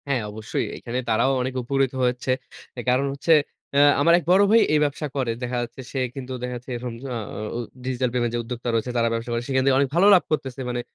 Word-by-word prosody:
হ্যাঁ, 135 -4 0
অবশ্যই। 110 +1 -3
এইখানে 120 +2 -4
তারাও 115 +4 +3
অনেক 130 +1 -2
উপকৃত 135 +1 0
হয়েছে 125 +1 0 0.5
এ - - -2
কারণ 130 +2 +2
হচ্ছে 140 +4 +2 0.4
অ্যা 140 - +5 0.2
আমার 170 +3 +5
এক - - -10
বড় 190 +2 +6
ভাই 230 +1 +7
এই 150 - +4
ব্যবসা 150 +1 -3
করে। 130 -4 0
দেখা 125 0 -2
যাচ্ছে 120 +2 -7
সে 135 - -2 0.2
কিন্তু 130 -1 -6
দেখা 125 0 -3
যাচ্ছে 125 +2 -10
এরকম 120 0 -5 0.2
আ - - -2 0.2
আ - - -5 0.2
ও - - -2 0.3
ডিজিটাল 130 -1 0
পেমেন্ট 120 -2 0
যে - - 0
উদ্যোক্তা 120 +1 -5
রয়েছে, 115 +2 0
তারা 115 0 +3
ব্যবসা 115 +1 -3
করে। 115 - 0
সেখান 130 -1 +1
থেকে 135 -1 +4
অনেক 140 -1 +2
ভালো 185 +4 +5
লাভ 180 - +4
করতেছে 135 -4 -2
মানে 120 0 -2
125 Hz, 235 wpm, -24 LUFS, 120-140 Hz, 0.5 s, ভাই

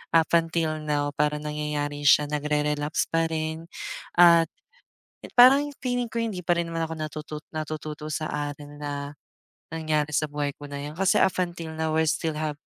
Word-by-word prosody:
up 165 -1 +5
until 165 -1 +1
now 145 -1 0
parang 150 0 0
nangyayari 145 -1 -3
siya, 150 +1 +6
nagre-relapse 150 0 0
pa 165 0 +2
rin. 160 +1 -3 0.5
At 170 -2 +7 0.9
parang 275 +4 +7
feeling 245 -1 0
ko 230 - -2
hindi 205 -5 -3
pa 175 0 +2
rin 170 -1 -1
naman 165 0 -1
ako 160 - -4
natutot 155 0 -6
natututo 155 -1 -5
sa 155 0 -2
aral 145 0 -4
na, 145 0 -4 0.6
nangyari 155 -2 -1
sa - - +2
buhay 145 -1 -2
ko 145 - -11
na 140 0 -6
'yan, 150 +2 -7
kasi 190 +1 +3
up 190 - +4
until 170 -2 -3
now 160 -1 -1
we 160 - +2
still 160 +1 0
have 150 -1 -2
155 Hz, 170 wpm, -26 LUFS, 150-165 Hz, 0.9 s, At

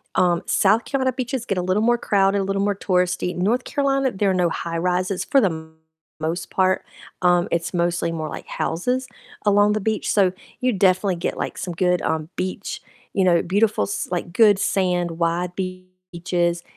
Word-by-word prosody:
um, 175 -1 +3
South 215 +4 +3
Carolina 260 -2 0
beaches 255 -1 -3
get 195 -5 -2
a - - 0
little 185 +4 +1
more 240 +1 +3
crowded, 200 -2 +2
a - - -1
little 195 0 -1
more 205 0 +1
touristy, 180 -2 0
North 220 +8 +1
Carolina, 275 -2 +1
there 200 -1 0
are - - +1
no 180 -2 +2
high-rises 180 +3 -1
for 275 - +4
the 205 - +4
m 160 -1 -8 0.5
most 165 +2 -3
part, 185 0 +1 0.4
um, 175 -1 +4
it's 170 +2 -1
mostly 170 -1 0
more 160 -2 -4
like - - -8
houses 250 +10 -1 0.4
along 205 0 +4
the 215 - -1
beach, 220 +1 -1
so 195 -3 +3 0.3
you 255 0 +2
definitely 185 0 +2
get, 170 - -3
like, - - -4
some 180 - -4
good, 180 +1 +1
um, 160 -1 -1
beach, 185 +2 -4 0.3
you 195 - +2
know, 170 -2 +4
beautiful, 205 - +1
s 100 0 -3
like, 175 -1 -3
good 210 -1 +5
sand, 180 -3 0
white 170 +1 0
beaches, 185 -2 -3
185 Hz, 185 wpm, -22 LUFS, 175-205 Hz, 0.5 s, good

